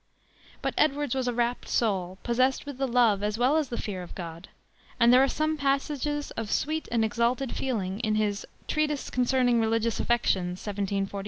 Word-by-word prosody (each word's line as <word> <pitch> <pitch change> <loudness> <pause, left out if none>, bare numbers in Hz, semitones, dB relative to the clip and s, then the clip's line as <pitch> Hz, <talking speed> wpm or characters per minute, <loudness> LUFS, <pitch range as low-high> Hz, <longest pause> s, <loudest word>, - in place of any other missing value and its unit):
But - - 0
Edwards 290 -3 +2
was 260 -2 -1
a 245 - 0
rapt 240 +1 -1
soul, 190 -5 0
possessed 255 +2 +1
with 285 -2 -7
the 270 - +1
love 235 -5 +3
as 210 +1 -1
well 255 +5 +3
as 305 -4 0
the 235 - -4
fear 190 -3 -4
of 175 - -9
the - - -11
God, 170 0 -8 0.5
and 235 +1 +6
there 255 - +7
are 310 +3 0
passages 290 +1 -1
of 225 -2 -5
sweet 315 +7 -1
and 230 -2 +2
exalted 235 +4 0
feeling 205 -7 -2
in 215 -3 0
his 210 -1 0 0.2
Treatise 300 -2 -1
Concerning 250 -1 +2
Religious 225 +1 0
Affections, 185 -6 +1
1746. 200 -1 -2
235 Hz, 180 wpm, -27 LUFS, 205-270 Hz, 0.5 s, there